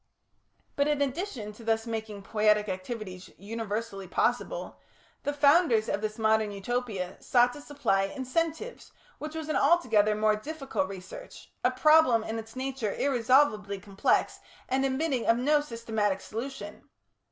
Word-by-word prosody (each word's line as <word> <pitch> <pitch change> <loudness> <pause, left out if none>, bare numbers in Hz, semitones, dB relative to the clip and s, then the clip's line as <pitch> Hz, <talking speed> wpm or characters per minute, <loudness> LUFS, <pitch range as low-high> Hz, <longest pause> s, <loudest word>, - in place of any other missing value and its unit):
But, 285 0 +2
in 295 -1 +1
addition 275 - -3
to 230 - -13
thus 225 0 0
making 220 -3 -5
poietic 210 0 +2
activities 185 -1 -6
universally 210 -1 -5
possible, - - -1 0.4
the 290 - -1
founders 285 -5 +4
of 205 - -1
this 215 0 -3
modern 220 -1 +2
Utopia 200 -3 -3
sought 245 0 +3
to 290 - -10
supply 195 -10 0
incentives, 325 - -3 0.3
which 305 +1 -6
was 320 -1 -4
an 310 - -1
altogether 215 -11 +3
more 215 0 +3
difficult 270 -3 -3
research, 195 - -10
a 250 - +5
problem 255 -3 +5
in 225 +1 -4
its 225 +1 -10
nature 260 -5 -3
irresolvably 240 -6 +2
complex, 195 +1 0 0.3
and 265 +1 +1
admitting 265 -2 0
of 230 - +5
no 295 +4 +3
systematic 225 -7 -2
solution. 220 -1 -7
230 Hz, 140 wpm, -28 LUFS, 210-280 Hz, 0.4 s, a